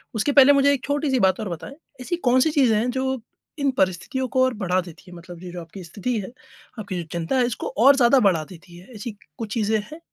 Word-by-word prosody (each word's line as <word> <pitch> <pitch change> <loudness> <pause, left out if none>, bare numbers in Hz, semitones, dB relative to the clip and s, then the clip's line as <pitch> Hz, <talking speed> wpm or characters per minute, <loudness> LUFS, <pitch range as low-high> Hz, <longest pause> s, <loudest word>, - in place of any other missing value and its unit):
उसके 220 +7 +1
पहले 280 0 +7
मुझे 280 0 +4
एक 275 - -3
छोटी-सी 285 -2 0
बात 190 0 +2
और 215 - -4
बताएँ, 175 - -7 0.3
ऐसी 345 +7 -2
कौन-सी 260 -1 +2
चीज़ें 260 -7 +3
हैं 240 +3 0
जो 265 -1 -2 0.4
इन 280 -1 +1
परिस्थितियों 190 +8 -1
को 260 0 +2
और 260 -1 +1
बढ़ा 185 -4 0
देती 175 -2 -13
है, 175 - -11
मतलब 175 0 -12
ये 180 - -8
जो 175 - -7
आपकी 175 +3 -11
स्थिति 210 +8 -3
है, 195 - -7 0.5
आपकी 190 -4 -4
जो - - -6
चिंता 170 +9 -2
है 250 - +3
इसको 240 - -4 0.2
और 275 0 +8
ज़्यादा 255 0 +5
बढ़ा 185 -8 +2
देती 175 -1 -14
है? 180 - -15
ऐसी 215 +3 -6 0.3
कुछ 215 -2 -5
चीज़ें 220 -1 +1
हैं? 310 - -9
225 Hz, 235 wpm, -23 LUFS, 185-265 Hz, 0.5 s, और